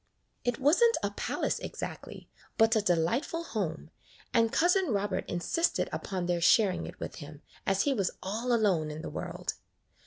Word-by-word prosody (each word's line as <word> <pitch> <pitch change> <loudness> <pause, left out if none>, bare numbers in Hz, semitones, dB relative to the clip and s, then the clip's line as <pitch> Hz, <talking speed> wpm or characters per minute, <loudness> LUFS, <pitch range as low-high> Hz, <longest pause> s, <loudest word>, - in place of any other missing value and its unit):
It 245 -1 0
was 295 - +3
n't 465 -1 +5
a - - 0
palace - - -2
exactly, - - -7 0.3
but 225 +1 +5
a 220 - +3
delightful 205 - 0
home, 175 - -4 0.4
and 230 -2 +3
Cousin 360 +6 +3
Robert 205 -5 -1
insisted 330 - 0
upon 185 -3 -3
their 175 -1 0
sharing 195 +1 +4
it - - -10
with - - -6
him, 150 -2 -10 0.2
as 195 0 +3
he 285 - +2
was 195 -7 0
all 220 +6 -2
alone 195 -9 +2
in 155 +1 -6
the - - -5
world. - - -4
210 Hz, 165 wpm, -30 LUFS, 175-250 Hz, 0.4 s, n't